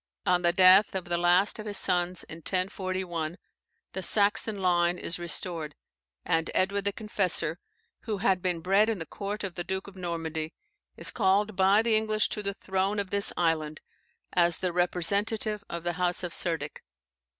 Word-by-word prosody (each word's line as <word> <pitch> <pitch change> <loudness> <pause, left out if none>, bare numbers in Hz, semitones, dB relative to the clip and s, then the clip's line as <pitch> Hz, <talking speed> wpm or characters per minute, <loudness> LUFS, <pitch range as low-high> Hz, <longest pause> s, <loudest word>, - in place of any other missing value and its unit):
On 180 -2 +3
the 175 -1 +3
death 185 +3 +6
of 185 -2 -3
the 175 0 -1
last 180 +5 +3
of 215 - -6
his 205 -1 +1
sons, 180 0 +1
in 160 - -10
1041, 185 -2 -3 0.6
the 190 - -3
Saxon 210 +2 +3
line 175 -1 +2
is 170 - -4
restored, 170 -3 -2 0.5
and 165 0 0
Edward 200 +2 +1
the 200 - +2
Confessor 195 -6 0 0.5
(who 215 -3 -2
had 190 -1 +1
been 175 -2 -1
bred 195 +5 +3
in 225 - -1
the 165 - -5
court 205 +3 -5
of 190 -3 -4
the 175 - -4
Duke 190 +1 -3
of 200 - -12
Normandy), 165 -3 -4 0.4
is - - +2
called 205 0 +1
by 195 +3 +4
the 230 -1 +2
English 215 -1 +1
to 210 - -4
the 200 -1 -3
throne 195 +2 -1
of 200 -2 -3
this 200 0 +1
island, 155 -3 0 0.5
as 170 -1 +3
the 180 -2 -2
representative 200 +4 0
of 170 -1 -5
the 175 0 -1
House 180 +1 0
of 175 -1 -4
Cerdic. 160 -4 -3
185 Hz, 175 wpm, -28 LUFS, 175-200 Hz, 0.6 s, death